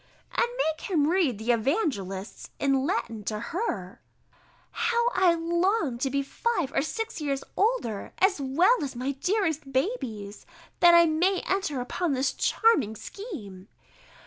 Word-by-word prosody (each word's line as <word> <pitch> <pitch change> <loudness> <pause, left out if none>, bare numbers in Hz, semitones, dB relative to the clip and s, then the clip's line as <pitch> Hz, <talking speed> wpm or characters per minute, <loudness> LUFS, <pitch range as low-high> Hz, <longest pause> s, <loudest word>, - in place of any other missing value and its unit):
_] - - -33 0.3
"and 475 - +3
make 315 -8 -1
him 305 -6 +2
read 335 - +2
the 220 +3 0
Evangelists 220 - -2
in 275 0 +1
Latin 230 - -2
to 215 0 -2
her." 235 - -4 0.7
[_How 470 0 +1
I 365 -2 +4
long 340 - 0
to 270 - 0
be 280 +1 0
five 355 - -1
or - - +2
six 440 +4 -4
years 275 -2 -2
older, 390 - 0
as 380 -5 +2
well 335 - +3
as 270 -3 -5
my 255 +3 -2
dearest 315 -1 -1
babies, 255 - -3 0.3
that 345 -1 +7
I 340 0 +7
may 350 +4 +2
enter 375 -8 -1
upon 305 +5 -1
this 265 +1 0
charming 290 - +2
scheme! 220 - -9
295 Hz, 145 wpm, -27 LUFS, 245-375 Hz, 0.7 s, that